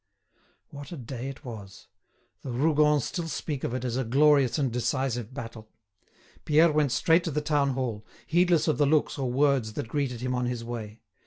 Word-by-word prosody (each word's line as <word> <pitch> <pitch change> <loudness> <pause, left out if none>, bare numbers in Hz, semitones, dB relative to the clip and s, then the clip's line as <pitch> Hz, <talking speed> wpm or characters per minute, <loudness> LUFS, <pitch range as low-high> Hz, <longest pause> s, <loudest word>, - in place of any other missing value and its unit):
What 145 -1 -9
a 170 - -6
day 125 +1 -6
it 135 +2 -10
was! 105 -5 -10 0.5
The 135 - -7
Rougons 150 +2 +3
still 170 -2 -4
speak 145 -2 -4
of 120 - -2
it 130 0 -3
as 120 0 -2
of 130 -3 -2
a - - -9
glorious 140 0 +4
and 135 -4 0
decisive 125 -1 -1
battle. 115 -4 -8 0.7
Pierre 155 +2 +4
went 150 -3 +1
straight 165 +5 +3
to - - -1
the 150 -1 -1
town 145 -2 +1
hall, 120 -5 -3 0.2
heedless 175 -1 +2
of 155 - +1
the 145 - +4
looks 150 -1 +1
or 130 -2 -1
words 135 -4 +2
that 110 - -4
greeted 125 -2 -2
him 125 0 -2
on 125 0 -1
his 120 -1 -3
way. 115 -2 -7
135 Hz, 195 wpm, -27 LUFS, 120-150 Hz, 0.7 s, glorious